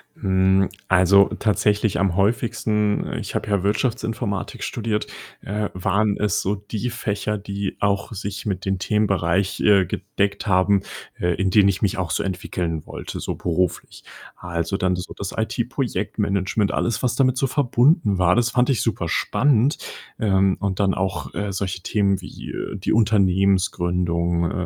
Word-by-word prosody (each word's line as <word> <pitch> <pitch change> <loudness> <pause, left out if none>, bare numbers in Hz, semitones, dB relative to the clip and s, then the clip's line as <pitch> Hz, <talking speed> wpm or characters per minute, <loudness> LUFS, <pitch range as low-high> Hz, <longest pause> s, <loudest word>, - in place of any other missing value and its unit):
Hm, 95 0 +2 0.2
also, 95 +1 +6
tatsächlich 105 -2 +1
am 95 -3 +1
häufigsten 105 0 0
ich - - -6
habe - - -2
ja 100 -2 +1
Wirtschaftsinformatik 105 -2 -2
studiert 110 -2 -2 0.4
äh, 105 +1 -3
waren 100 +3 +1
es 105 -3 0
so 100 +2 0
die 105 +4 -4
Fächer, 105 -1 -2
die 100 -1 -4
auch 100 +2 0
sich 100 +1 -5
mit 95 -2 -2
den 95 -1 0
Themenbereich, 100 -3 +1
äh, 100 -3 +5
gedeckt 100 +5 -2
haben, 95 +1 +3 0.4
äh, 90 -1 +1
in 95 0 0
denen 100 -1 +5
ich 100 +2 -2
mich 95 -1 0
auch 85 -3 -2
so - - 0
entwickeln 85 -4 -3
wollte, - - -7
so - - -3
beruflich. 90 0 -2 0.3
Also, 85 0 -3
dann 95 -2 +1
so 90 - -6
das 100 - -5
IT-Projektmanagement, 105 -4 -1
alles, 120 +1 -1
was 125 -1 +1
damit 130 -2 +2
so 135 - +2
verbunden 125 - +2
war, 90 0 +4
das 120 0 +2
fand 125 +1 +2
ich 125 - +1
super 105 -7 -1
spannend. 130 - +2 0.4
Ähm, 95 -3 +2
und 100 -1 -2
dann 95 -2 +2
auch, 95 -1 -3
äh, 105 -1 -2
solche 95 -1 -3
Themen 100 -3 +1
wie, - - -10
äh, - - -5
die 100 - -2
Unternehmensgründung, 90 -5 +2
100 Hz, 155 wpm, -22 LUFS, 95-105 Hz, 0.4 s, also